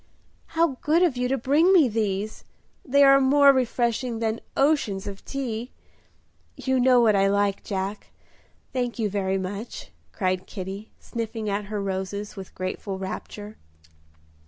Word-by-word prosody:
"How 325 -6 +2
good 325 +4 +3
of 335 -8 +2
you 250 0 0
to 270 +2 0
bring 290 +9 +3
me 340 -8 +6
these! 215 -2 -2 0.4
They 280 +1 +4
are 275 0 +7
more 280 +1 +6
refreshing 240 -1 0
than 225 0 -2 0.2
oceans 270 -9 +1
of 200 -1 -7
tea. 245 -3 -4 0.9
You 260 -1 0
know 250 0 +5
what 220 -3 +4
I 195 0 +4
like, 200 0 +1
Jack; 195 +1 -4 0.7
thank 245 -2 -2
you 215 -4 -1
very 195 -1 0
much" 200 +4 -6 0.2
cried 185 -2 -1
Kitty, 195 +2 -7
sniffing 225 -2 -4
at 200 +1 -2
her 210 0 -4
roses 195 +1 -4
with 190 -2 -10
grateful 185 +1 -4
rapture. 205 +2 -7
220 Hz, 145 wpm, -25 LUFS, 200-260 Hz, 0.9 s, are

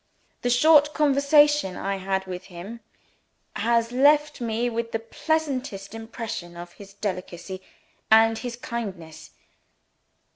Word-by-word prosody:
The 245 - 0
short 295 +4 +5
conversation 290 -6 +3
I 195 0 -2
had 190 0 -2
with 185 -1 -7
him 195 +6 -9 0.8
has 230 0 +1
left 295 +2 +3
me 230 +1 -1
with 230 -1 -3
the - - +2
pleasantest 255 -4 -3
impression 225 -6 -7
of 175 0 -9
his 195 -1 -14
delicacy 185 -2 -5 0.5
and 225 +1 +6
his 235 +2 -5
kindness. 195 -10 -7
225 Hz, 115 wpm, -25 LUFS, 195-265 Hz, 0.8 s, and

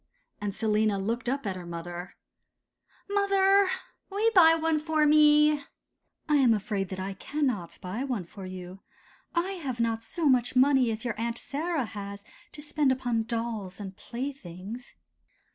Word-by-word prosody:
And 205 -1 -3
Selina 215 -1 +2
looked 230 +5 -2
up 275 -1 -2
at 195 -2 -2
her 180 -2 -8
mother. 175 +1 -7 0.9
'Mother, 395 -1 +4 0.4
will 400 +1 -4
you 455 +1 +4
buy 325 -4 +8
one 325 -1 +1
for 310 0 +1
me?' 300 0 +6 0.7
'I 300 - +3
am 255 -5 +5
afraid 200 -2 -2
that 190 - -5
I 195 +1 -3
cannot 240 - -2
buy 205 +7 -4
one 245 -10 -2
for 190 +2 -9
you. 185 0 -8 0.6
I 345 +3 +1
have 280 -11 -4
not 230 -1 0
so 310 +7 -2
much 250 -2 +3
money 260 -1 +5
as 225 +2 -3
your 235 - 0
Aunt 235 0 -1
Sarah 305 0 -2
has 200 -1 -7 0.3
to 295 - -6
spend 295 -2 +1
upon 245 -3 0
dolls 225 -5 -4
and 195 -2 -7
playthings. 235 -3 -7
240 Hz, 160 wpm, -28 LUFS, 200-300 Hz, 0.9 s, buy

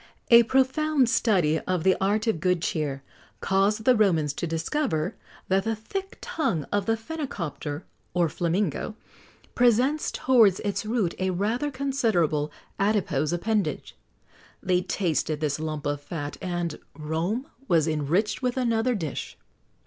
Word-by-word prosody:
A 235 0 +10
profound 265 +3 +2
study 175 -11 +2
of 180 -1 -2
the 190 0 +4
art 210 +3 +1
of 220 -8 0
good 180 +1 +2
cheer 140 -4 -2 0.4
caused 200 +3 +1
the 255 - +6
Romans 165 -9 +2
to 170 - -3
discover 165 - -1 0.3
that 190 +1 +2
the 225 0 0
thick 385 - -6
tongue 175 - -1
of 205 -1 0
the 225 0 +2
phenicopter, 185 - -5 0.3
or 175 -1 +3
flamingo, 175 - -1 0.6
presents 245 +5 +3
towards 230 -8 +4
its 205 +1 -2
root 215 -7 0
a 185 0 0
rather 215 +10 0
considerable 220 - 0 0.3
adipose 195 -8 +1
appendage. 205 +4 -1 0.7
They 180 -1 +2
tasted 160 -5 -1
this 150 -1 -1
lump 155 -2 -4
of 145 0 -1
fat, 145 -1 -5
and 175 -4 -3 0.2
Rome 165 - -2 0.2
was 165 -3 +3
enriched 165 +8 0
with 250 0 -1
another 240 0 +1
dish. 160 -9 -5
190 Hz, 135 wpm, -26 LUFS, 160-230 Hz, 0.7 s, A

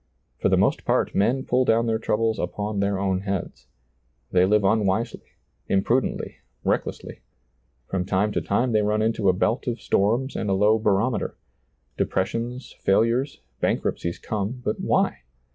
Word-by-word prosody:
For - - +2
the - - +3
most - - +2
part - - +1
men 130 +6 +1
pull 125 +1 +2
down 115 -1 +3
their 110 -1 0
troubles 110 0 0
upon 105 0 -3
their 100 0 +1
own 95 -1 0
heads. 100 -1 -4 0.6
They 90 0 +4
live 105 +1 +3
unwisely, 105 +2 +1 0.5
imprudently, 115 +6 0 0.3
reck - - +1
lessly. - - -8 0.7
From 90 -2 -2
time 100 +2 +1
to - - -1
time 120 +5 0
they 110 -1 +3
run 105 +1 +1
into 110 -3 +1
a - - +4
belt 110 +8 0
of 120 -1 -2
storms 120 +7 +1
and 105 - -2
a - - +2
low 105 +3 +3
barometer; 105 +2 0 0.6
depressions, 115 +6 -2
fail 95 +2 +3
ures, 120 - -1 0.2
bankruptcies 85 0 -1
come; 110 +4 -4
but 105 - -1
why - - +1
105 Hz, 160 wpm, -24 LUFS, 100-115 Hz, 0.7 s, They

